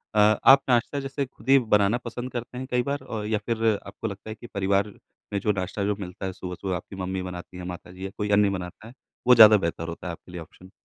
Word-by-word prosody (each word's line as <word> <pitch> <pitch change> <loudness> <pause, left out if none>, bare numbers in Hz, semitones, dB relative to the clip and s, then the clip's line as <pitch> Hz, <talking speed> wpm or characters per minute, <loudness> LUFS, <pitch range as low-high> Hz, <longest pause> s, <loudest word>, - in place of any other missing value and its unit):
अ 105 0 +5
आप 135 0 +7
नाश्ता 125 +4 +2
जैसे 135 0 -3
ख़ुद 130 0 -13
ही 135 - +8
बनाना 105 -1 +2
पसंद 120 +2 -5
करते 120 +1 -6
हैं 130 0 -5
कई 125 0 +2
बार 145 +1 -2
और 105 -2 -5
या 110 -1 +1
फ़िर 115 -1 -1 0.2
आपको 110 - -5
लगता 100 +1 -8
है 110 - -5
कि 120 - -12
परिवार 100 +1 +1 0.4
में 100 - +1
जो 105 +2 +1
नाश्ता 95 +1 -3
जो 105 0 0
मिलता 90 0 -6
है 95 - -3
सुबह-सुबह 90 +1 -4
आपकी 95 +2 -8
मम्मी 95 0 -3
बनाती 90 0 -8
हैं 90 - -7
माता 90 - -11
जी 95 +1 -8
या 95 - -5
कोई 105 0 -2
अन्य 100 0 +5
बनाता 90 +3 -6
है, 120 - -12 0.3
वो 125 - +8
ज़्यादा 110 -2 +9
बेहतर 85 -2 -3
होता 85 +2 -7
है - - -2
आपके 90 - -14
लिए 90 -1 -6
ऑप्शन। 95 +3 -15
105 Hz, 255 wpm, -25 LUFS, 95-115 Hz, 0.4 s, ज़्यादा